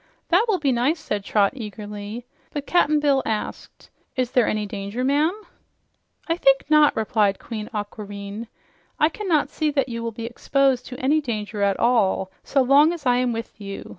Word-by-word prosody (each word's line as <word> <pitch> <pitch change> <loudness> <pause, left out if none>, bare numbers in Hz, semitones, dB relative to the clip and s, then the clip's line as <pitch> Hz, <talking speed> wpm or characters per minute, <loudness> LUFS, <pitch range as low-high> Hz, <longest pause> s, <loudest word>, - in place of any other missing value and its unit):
"That 365 +6 +4
will 425 -4 +2
be 290 -5 +1
nice," 260 +7 +1
said 210 -9 -3
Trot 200 -1 +2
eagerly. 210 0 -7 0.3
But 290 -1 -4
Cap'n 305 -3 +3
Bill 280 -2 +3
asked, 215 -1 -5 0.2
"Is 255 -1 -1
there 250 -3 +3
any 215 -1 -1
danger, 205 +3 -4
ma'am?" 300 +9 +1 0.9
"I 330 0 0
think 270 -5 +4
not," 305 -1 +6
replied 215 -3 +1
Queen 215 -2 -6
Aquareine. 205 0 -6 0.5
"I 305 - +4
cannot 340 -5 0
say 310 -1 0
that 275 -3 0
you 230 -1 -4
will 230 0 -3
be 225 +1 -7
exposed 260 +1 +1
to 250 - -8
any 295 +4 +2
danger 215 -5 -4
at 200 -1 +1
all, 200 -5 +2
so 275 -1 +2
long 285 +6 +5
as 325 -5 -8
I'm 250 0 +2
with 230 -1 -6
you. 195 -1 -7
245 Hz, 175 wpm, -23 LUFS, 210-290 Hz, 0.9 s, not